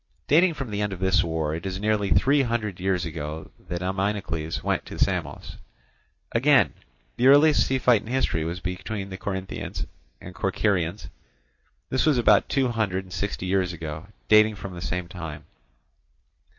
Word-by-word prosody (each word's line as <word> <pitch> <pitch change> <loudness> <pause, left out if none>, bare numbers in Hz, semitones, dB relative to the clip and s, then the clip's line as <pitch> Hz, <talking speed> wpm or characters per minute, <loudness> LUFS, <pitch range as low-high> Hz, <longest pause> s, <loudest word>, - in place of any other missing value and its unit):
Dating 165 +3 +4
from 135 -6 -5
the 105 0 -2
end 105 -1 -1
of 90 - -7
this 95 0 +3
war, 80 -2 -2
it 80 +1 -5
is 95 -1 -4
nearly 105 -1 +1
three 140 +7 +4
hundred 115 -7 -2
years 90 -2 0
ago 80 -1 -6 0.2
that 90 0 -3
Ameinocles 95 -4 -2
went - - 0
to - - -8
Samos. - - -2 0.7
Again, - - +4 0.4
the 125 - +3
earliest 145 +2 +6
sea 135 - +1
fight 125 -4 +4
in - - -13
history 120 -10 0
was 85 +3 -4
between 95 +2 -5
the 95 - -5
Corinthians 95 -1 -4 0.3
and 90 - -10
Corcyraeans; 95 -1 -1 0.8
this 130 +4 +1
was 150 -4 +4
about 120 - +4
two 135 -3 +1
hundred 100 -5 -1
and 90 -1 -12
sixty 100 -1 -3
years 90 -1 +1
ago, 80 +1 -6 0.2
dating 110 0 +5
from 100 -2 -8
the 85 - -8
same 90 0 -3
time. 80 -4 -7
95 Hz, 165 wpm, -25 LUFS, 90-110 Hz, 0.8 s, earliest